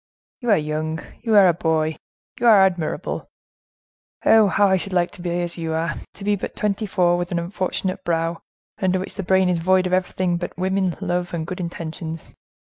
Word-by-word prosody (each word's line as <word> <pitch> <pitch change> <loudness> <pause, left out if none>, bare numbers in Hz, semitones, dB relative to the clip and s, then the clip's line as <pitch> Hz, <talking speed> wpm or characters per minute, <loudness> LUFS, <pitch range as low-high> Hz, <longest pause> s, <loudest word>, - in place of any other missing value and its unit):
"You 240 - -3
are 205 - +6
young, 155 +1 -2 0.2
you 225 -2 +1
are 200 -2 +8
a 175 - +4
boy, 160 -1 0 0.4
you 240 - +2
are 210 -4 +8
admirable. 175 -4 -2 1.0
Oh, 220 -2 +6
how 200 +1 +3
I 190 - +4
should 190 +1 -4
like 175 -1 +2
to 205 - -12
be 175 0 -1
as 175 0 -4
you 165 -1 -2
are! 165 +1 -1 0.2
To 195 - -9
be 205 +1 +2
but 200 - -6
twenty 210 +1 -1
four, 175 -2 +2
with 175 0 -3
an 175 - 0
unfortunate 185 +1 -2
brow, 165 0 -1 0.4
under 185 -1 +2
which 185 - -5
the 200 - -4
brain 190 0 +3
is 180 -2 +1
void 185 +2 +3
of 185 - -1
everything 185 -1 0
but 175 - -6
women, 190 -1 0
love, 175 0 -1
and 160 -1 -3
good 180 +2 -6
intentions. 165 -2 -6
180 Hz, 200 wpm, -22 LUFS, 170-190 Hz, 1.0 s, are